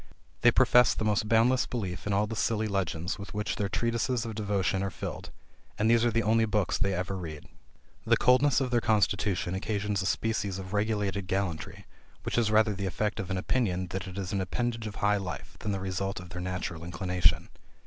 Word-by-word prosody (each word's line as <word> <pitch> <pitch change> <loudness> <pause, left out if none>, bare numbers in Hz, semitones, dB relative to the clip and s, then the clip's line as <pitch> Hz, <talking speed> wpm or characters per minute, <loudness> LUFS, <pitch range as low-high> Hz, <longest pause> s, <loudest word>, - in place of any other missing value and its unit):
They - - +7
profess 125 -2 +5
the 110 - -2
most 105 0 +1
boundless 120 +3 +4
belief 95 -6 -4
in - - 0
all 100 +2 +3
the 115 +1 -5
silly 110 0 0
legends 95 -2 -2
with 100 0 -8
which 105 0 -2
their 100 -1 -1
treatises 115 +3 0
of 115 - -4
devotion 100 -3 0
are 100 - -1
filled; - - -6 0.5
and 110 - +1
these 115 -1 +4
are 120 - +4
the 115 0 +1
only 110 +1 +3
books 105 -3 0
they 100 -1 +1
ever 90 +2 -2
read. 80 -5 -7 0.6
The - - +4
coldness 130 +3 +4
of 130 -2 -1
their 120 -1 +3
constitution 100 -4 +1
occasions 100 +1 -1
a 95 - -1
species 100 -3 -1
of 95 0 -7
regulated 105 -2 0
gallantry, 95 -4 -3 0.4
which - - 0
is 115 -3 +2
rather 110 0 +4
the 100 0 -3
effect 105 +3 -2
of 95 - -4
an 95 - -1
opinion 95 -4 0
that 95 0 -4
it 95 +1 -8
is 100 0 -4
an 100 - 0
appendage 115 +3 -2
of 105 - -7
high 105 0 +2
life, 90 -8 -6
than 105 - -3
the 100 - -1
result 95 +1 -3
of 90 0 -10
their 90 0 -5
natural 90 -3 -4
inclination. 90 0 +1
100 Hz, 210 wpm, -29 LUFS, 95-110 Hz, 0.6 s, They